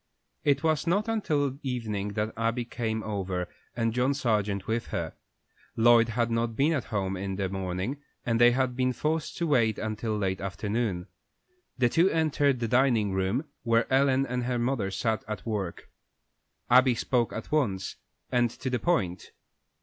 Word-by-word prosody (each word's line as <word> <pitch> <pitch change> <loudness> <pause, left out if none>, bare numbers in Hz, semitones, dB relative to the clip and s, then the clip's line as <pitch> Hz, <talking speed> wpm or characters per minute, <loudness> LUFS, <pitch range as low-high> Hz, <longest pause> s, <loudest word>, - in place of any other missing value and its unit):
It 140 0 +2
was 155 0 +1
not 200 +6 +2
until 145 - 0
evening 110 -6 -3
that 105 +1 -2
Abby 115 +2 -1
came 110 -2 -3
over, 95 -4 -2 0.3
and 115 -1 0
John 125 +3 +1
Sargent 105 -7 0
with 115 +1 -1
her. - - -3 0.6
Lloyd 115 0 +5
had 115 0 0
not 115 0 0
been 145 +6 +3
at 140 -6 -1
home 95 -2 -2
in 95 +1 -3
the 95 -1 -1
morning, 95 +8 -3 0.2
and 115 -1 +1
they 120 - +9
had 125 0 0
been 130 0 +1
forced 155 +4 -2
to 170 - 0
wait 115 -8 +2
until 110 0 -2
late 95 -2 -1
afternoon. 100 -1 -2 0.7
The 125 -2 +4
two 170 +9 +3
entered 145 -6 +1
the 115 - 0
dining 120 -4 +3
room, 95 +9 0 0.2
where 115 -1 +2
Ellen 135 0 +4
and 125 -1 -2
her 125 0 0
mother 120 -4 0
sat 110 +3 -1
at 105 0 -5
work. 100 -6 -3 0.8
Abby 125 0 +5
spoke 120 0 0
at 110 - -7
once, 105 -12 0 0.3
and 120 -1 +3
to 130 +3 -5
the 125 - 0
point. 95 - 0
115 Hz, 165 wpm, -28 LUFS, 105-130 Hz, 0.8 s, they